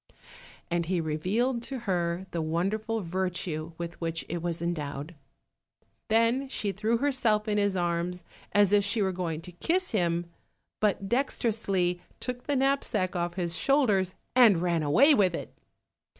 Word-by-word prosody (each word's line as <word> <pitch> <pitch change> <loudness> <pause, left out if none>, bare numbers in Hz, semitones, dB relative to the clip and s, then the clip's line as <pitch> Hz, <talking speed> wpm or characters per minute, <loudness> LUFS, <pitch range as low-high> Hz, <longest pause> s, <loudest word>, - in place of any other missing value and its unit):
And 170 -1 0
he 180 -1 +1
revealed 195 +11 0
to 255 +1 -4
her 175 -3 -1
the 170 - -2
wonderful 205 +8 -1
virtue 170 -3 -3
with 170 0 -6
which 165 -1 -2
it 170 0 -3
was 170 -1 -2
endowed. 150 -2 -4 0.9
Then 230 +5 +2
she 210 -6 -2
threw 220 +4 0
herself 235 -5 +1
in 210 -1 +1
his 200 -2 +1
arms 175 0 -1 0.3
as 205 -1 +4
if 205 -1 +5
she 205 +1 0
were 190 - +1
going 170 -3 -3
to 180 - -8
kiss 350 - +1
him, 175 -4 +1 0.5
but 200 -2 +1
dexterously 200 -7 0 0.2
took 250 -1 -5
the 290 - +1
knapsack 255 -8 +1
off 175 0 -2
his 175 -2 -2
shoulders, 210 -10 +2 0.2
and 230 -8 +7
ran 170 -2 +1
away 245 - +5
with 190 -9 +3
it. - - -7
190 Hz, 150 wpm, -28 LUFS, 170-225 Hz, 0.9 s, and